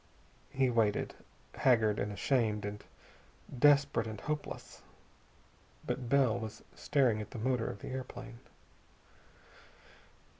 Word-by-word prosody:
He 135 -2 +1
waited, 110 -3 +1 0.4
haggard 110 -5 +3
and 105 - -1
ashamed 105 -2 0
and 105 0 -6 0.8
desperate 140 -4 +4
and 110 -2 -6
hopeless. 150 +4 -5 1.0
But 125 -2 -3
Bell 130 -5 +3
was 110 -1 -7
staring 125 -7 +2
at 105 - -7
the - - -8
motor 120 0 0
of - - -6
the - - -6
airplane. 130 -2 -7
120 Hz, 110 wpm, -33 LUFS, 110-130 Hz, 1.0 s, desperate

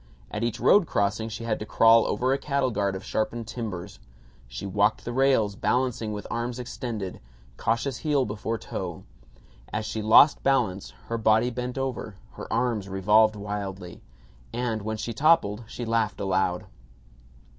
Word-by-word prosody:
At 105 +2 -3
each 120 0 -1
road 200 -5 +5
crossing 105 +3 0
she 115 - -6
had 115 -2 -1
to 105 - -5
crawl 115 +1 +5
over 130 +2 +1
a 135 - -1
cattle 140 -2 0
guard 100 -2 -1
of 95 - -6
sharpened 115 +3 -2
timbers. 100 -6 -6 0.5
She - - -7
walked 100 +3 +1
the 120 - -4
rails, 130 -6 +2
balancing 125 -1 0
with 105 -1 -5
arms 120 +1 -2
extended, 115 -6 -5 0.4
cautious 120 +3 -1
heel 145 -4 +1
before 110 +2 -3
toe. - - -6 0.7
As 105 +1 -2
she 110 0 -3
lost 110 +7 +6
balance 115 -9 +1 0.2
her 115 0 -3
body 110 +2 +3
bent 125 +1 -4
over, 130 -6 -3 0.2
her - - -9
arms 115 -5 0
revolved 105 +3 +4
wildly, 100 -3 -6 0.5
and 115 -2 -2
when 110 +1 -3
she 115 +2 -4
toppled 120 -6 +3
she 120 - -6
laughed 115 -2 0
aloud. 95 -2 0
110 Hz, 155 wpm, -26 LUFS, 105-125 Hz, 0.7 s, lost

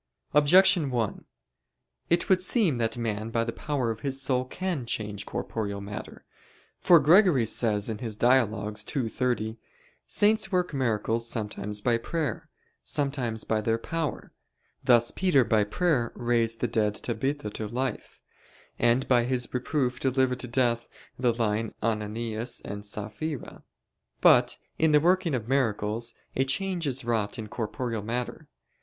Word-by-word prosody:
Objection 165 +2 +5
1: 120 -5 -2 0.8
It 170 +1 +2
would 185 -1 +4
seem 185 - +2
that 115 +1 0
man 110 -2 -2
by 115 0 0
the 115 - -3
power 135 -5 -2
of 110 - -6
his 135 +3 -1
soul 130 -1 +1
can 175 0 -3
change 105 -3 -4
corporeal 100 -3 -3
matter. 100 +1 -8 0.5
For 175 -2 +6
Gregory 160 - +5
says 105 -2 +1 0.3
(Dialog. 110 -3 +2 0.2
ii, 130 -5 0
30): 115 -2 -2 0.5
"Saints 210 -1 +2
work 180 -3 0
miracles 115 -3 0
sometimes 105 -2 -3
by 115 +1 +2
prayer, 160 +4 -3 0.3
sometimes 135 -6 -1
by 110 -1 0
their 115 +1 +1
power: 160 +5 -4 0.5
thus 120 -1 +4
Peter, 180 -9 +3
by 110 -1 +2
prayer, 130 - 0
raised 115 -1 0
the 120 - +2
dead 105 -2 0
Tabitha 125 0 -3
to 110 0 -5
life, 125 +1 -4 0.6
and 120 +3 +2
by 120 -2 +4
his 125 -1 -1
reproof 125 0 -1
delivered 130 -1 +1
to 125 - -2
death 120 -1 0 0.3
the 125 -2 +3
lying 115 -1 -1
Ananias 110 +2 -2
and 100 0 -5
Saphira." 110 +8 -5 0.6
But - - +5 0.2
in 160 -1 +3
the 150 - +7
working 175 -1 +2
of 115 -3 -4
miracles 115 -3 0 0.2
a 135 - +2
change 175 +4 -1
is 130 -2 -2
wrought 110 -3 -1
in 110 -2 -6
corporeal 115 0 -3
matter. 120 +3 -4
120 Hz, 140 wpm, -27 LUFS, 110-140 Hz, 0.8 s, the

